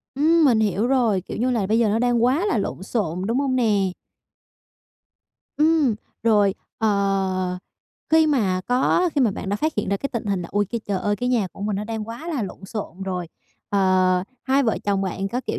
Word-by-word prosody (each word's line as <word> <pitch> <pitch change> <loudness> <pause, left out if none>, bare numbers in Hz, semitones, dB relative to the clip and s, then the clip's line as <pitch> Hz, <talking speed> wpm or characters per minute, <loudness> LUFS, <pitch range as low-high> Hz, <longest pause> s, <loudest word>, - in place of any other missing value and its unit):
Ừm, 320 +3 +4
mình 235 -5 +4
hiểu 210 +2 +1
rồi, 240 -7 +2
kiểu 190 - -7
như 250 +2 +1
là 225 -6 0
bây 220 +3 +2
giờ 225 -2 +3
nó 215 +2 +1
đang 240 -1 +2
quá 295 - +2
là 235 - +1
lộn 195 - -3
xộn, 190 -4 -2
đúng 235 +4 0
hông 270 -2 0
nè? 205 -6 +2 1.6
Ừm, 305 -6 +3 0.3
rồi, 210 -3 +3 0.2
ờ, 195 -3 0 0.5
khi 320 0 +5
mà 200 -11 +1
có 270 +8 +2
khi 285 - +2
mà 230 -5 +4
bạn 190 - -6
đã 205 - 0
phát 310 +5 0
hiện 210 - -1
ra 200 - +1
cái 275 - -4
tình 230 -3 -3
hình 195 -3 -1
là 170 - -7
"Ôi, 205 0 +2
cái 235 - -2
trời 200 -2 -1
ơi, 205 0 -1
cái 245 0 -2
nhà 230 -6 +1
của - - -13
mình 205 -1 -1
nó 210 - -3
đang 220 0 -5
quá 265 +9 -7
là 290 -9 -1
lộn 195 0 -7
xộn 195 -3 -6
rồi." 180 -2 -3 0.4
Ờ, 185 -2 +3 0.2
hai 275 +1 +2
vợ 225 -4 +1
chồng 200 -1 +1
bạn 190 +1 -2
có, 245 +5 -2
kiểu - - -2
215 Hz, 220 wpm, -23 LUFS, 195-250 Hz, 1.6 s, khi